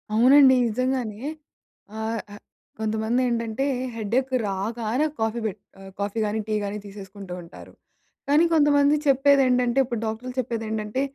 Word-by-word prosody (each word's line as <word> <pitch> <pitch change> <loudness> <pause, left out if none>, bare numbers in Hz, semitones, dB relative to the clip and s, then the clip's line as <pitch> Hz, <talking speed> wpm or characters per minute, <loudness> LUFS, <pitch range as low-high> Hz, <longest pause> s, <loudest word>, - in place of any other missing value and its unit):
అవునండి. 260 +3 +7
నిజంగానే 240 -2 -2 0.8
ఆహ్, 220 0 -2
ఆహ్, 205 - -12 0.4
కొంతమంది 220 +3 0
ఏండంటే 230 +2 -1 0.3
హెడేక్ 235 +5 -1
రాగానే 220 +7 -1
కాఫీ 220 +1 -1
పెట్ 210 -1 -3 0.2
ఆహ్, 195 0 -11
కాఫీ 205 +2 -2
కానీ, 210 +1 -2
టీ 215 - -1
గాని 200 +1 -3
తీసేసుకుంటూ 195 -2 -9
ఉంటారు. 170 - -13 0.6
కానీ 300 +4 +5
కొంతమంది 290 -1 +4
చెప్పేదేంటంటే 265 -2 +3
ఇప్పుడు 240 -3 -4
డాక్టర్లు 225 +3 -4
చెప్పేది 230 -2 -3
ఏండంటే 215 +3 -2
230 Hz, 130 wpm, -24 LUFS, 215-260 Hz, 0.8 s, అవునండి